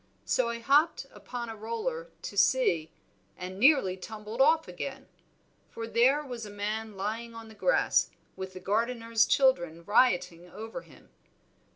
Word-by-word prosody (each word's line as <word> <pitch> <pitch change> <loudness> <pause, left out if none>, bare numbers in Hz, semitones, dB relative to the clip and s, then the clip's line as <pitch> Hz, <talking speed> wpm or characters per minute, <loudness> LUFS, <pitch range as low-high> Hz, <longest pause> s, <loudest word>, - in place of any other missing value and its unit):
So 250 -2 +1
I 235 - -3
hopped 280 +6 +2
upon 240 -1 -6
a 225 - -6
roller 470 - -4
to - - -6
see, 190 -7 +2 0.5
and 185 +1 -7
nearly 260 -8 +5
tumbled 215 +5 -5
off 320 +3 +4
again; - - -6 0.6
for 230 - -6
there 255 +6 +3
was 245 -4 -6
a 210 - -7
man 210 +1 -4
lying 225 +4 -4
on 225 -1 -10
the - - -12
grass, - - +2 0.3
with 190 0 -7
the 185 - -8
gardener's 230 +3 +1
children 175 - +2
rioting 180 -6 +2
over 225 +6 -7
him. - - -19
225 Hz, 150 wpm, -29 LUFS, 195-255 Hz, 0.6 s, nearly